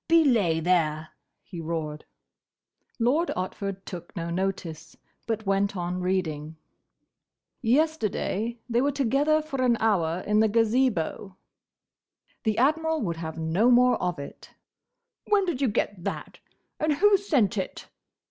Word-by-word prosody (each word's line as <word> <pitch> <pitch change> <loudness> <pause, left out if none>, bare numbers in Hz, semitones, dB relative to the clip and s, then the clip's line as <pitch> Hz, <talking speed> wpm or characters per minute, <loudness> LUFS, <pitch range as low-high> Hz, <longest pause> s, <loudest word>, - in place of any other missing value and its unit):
"Belay, 240 - +4
there!" 155 -3 +1 0.3
he 175 -3 -8
roared. 155 -2 -4 0.9
Lord 270 +9 +2
Otford 195 +1 -4
took 175 +2 -9
no 170 -1 -4
notice, 170 -4 -4 0.3
but 220 -1 -2
went 195 0 +1
on 180 +1 -3
reading: 160 -4 -2 1.1
"'Yesterday 235 -4 0
they 240 0 +1
were 285 +2 +2
together 285 +4 +2
for 275 -4 -4
an 245 -2 +3
hour 185 -6 +1
in 210 0 +2
the 220 - +5
Gazebo—'" 220 -5 +1 1.1
The 215 -1 +1
Admiral 315 +4 +2
would 170 -4 -2
have 160 -1 -6
no 165 +9 +2
more 250 0 +4
of 180 -1 -1
it. 140 - -9 0.8
"When 410 -2 +3
did 330 -7 -2
you 270 - +3
get 205 -4 -2
that, - - -5 0.4
and 310 0 +2
who 405 +7 +5
sent 280 - +1
it?" 190 -3 -4
210 Hz, 130 wpm, -26 LUFS, 175-260 Hz, 1.1 s, the